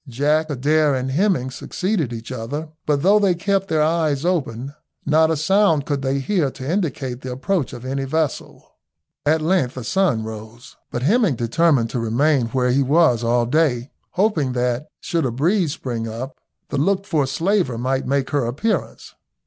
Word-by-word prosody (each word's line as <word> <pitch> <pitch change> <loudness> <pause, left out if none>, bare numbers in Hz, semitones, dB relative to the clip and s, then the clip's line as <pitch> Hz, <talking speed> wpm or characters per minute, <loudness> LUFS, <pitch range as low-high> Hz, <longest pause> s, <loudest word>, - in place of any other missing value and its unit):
Jack, 150 +5 +1
Adair, 145 +1 +2
and 130 0 -2
Hemming 160 -5 +1
succeeded 180 - -2
each 115 +1 -7
other, 135 +6 -5 0.2
but 145 -1 +1
though 205 +3 +5
they 195 -4 +3
kept 195 +2 0
their 155 -5 +2
ears 155 -2 +1
open 140 -7 -1 0.3
not 160 +2 +4
a 160 - +1
sound 165 -2 +3
could 145 -2 -2
they 135 0 0
hear 150 +1 0
to 130 0 -8
indicate 140 -8 -2
the 130 - -6
approach 145 +4 -1
of 120 - -9
any 135 +1 -2
vessel. 155 +1 -2 0.6
At 155 +1 +3
length 160 -7 +1
the 130 - -5
sun 140 - +1
rose, 110 +4 -9
but 120 - -4
Hemming 205 - +3
determined 120 0 +2
to 125 - -2
remain 125 +3 +2
where 125 +1 0
he 135 +3 +3
was 135 -4 +3
all 120 +1 +2
day, 130 -2 +1 0.2
hoping 175 -10 +1
that, 125 +2 -1
should 165 -2 -1
a 130 - +1
breeze 160 - +1
spring 120 -7 -4
up, 120 +5 -6 0.3
the - - -1
looked 195 +6 +1
for 155 -8 +1
slaver 165 - 0
might 130 +2 -1
make 135 0 0
her 140 -5 +1
appearance. 155 - -2
140 Hz, 175 wpm, -21 LUFS, 125-165 Hz, 0.6 s, though